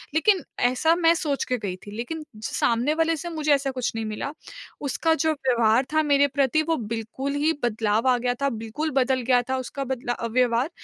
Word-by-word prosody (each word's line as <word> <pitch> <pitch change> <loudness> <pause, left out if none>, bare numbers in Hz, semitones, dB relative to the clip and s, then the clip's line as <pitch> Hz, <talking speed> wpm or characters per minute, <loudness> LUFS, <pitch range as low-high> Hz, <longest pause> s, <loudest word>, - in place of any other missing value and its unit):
लेकिन 370 0 +3 0.3
ऐसा 320 +6 +2
मैं 335 -1 +4
सोच 290 -5 -1
के 250 - -1
गई 200 -5 -4
थी, 205 - -9
लेकिन 305 +7 -5 0.2
सामने 240 +6 +1
वाले 325 0 +1
से 345 - -5
मुझे 310 -3 +1
ऐसा 275 -1 -2
कुछ 255 -2 -2
नहीं 225 -1 -2
मिला। 215 +7 -4 0.5
उसका 310 +3 +1
जो 315 - +3
व्यवहार 245 -3 +2
था 310 0 +3
मेरे 285 -1 +4
प्रति, 280 +2 +1
वो 325 0 0 0.2
बिल्कुल 260 +5 -4
ही 325 - +4
बदलाव 220 0 +1
आ 250 - +4
गया 245 0 0
था, 280 - +3
बिल्कुल 225 +7 -4
बदल 260 0 +1
गया 245 - +5
था 260 - +1
उसका 260 +2 -4
बदला 245 -1 -3
अ, 235 - -4
व्यवहार 245 +3 +1
265 Hz, 205 wpm, -24 LUFS, 235-310 Hz, 0.5 s, गया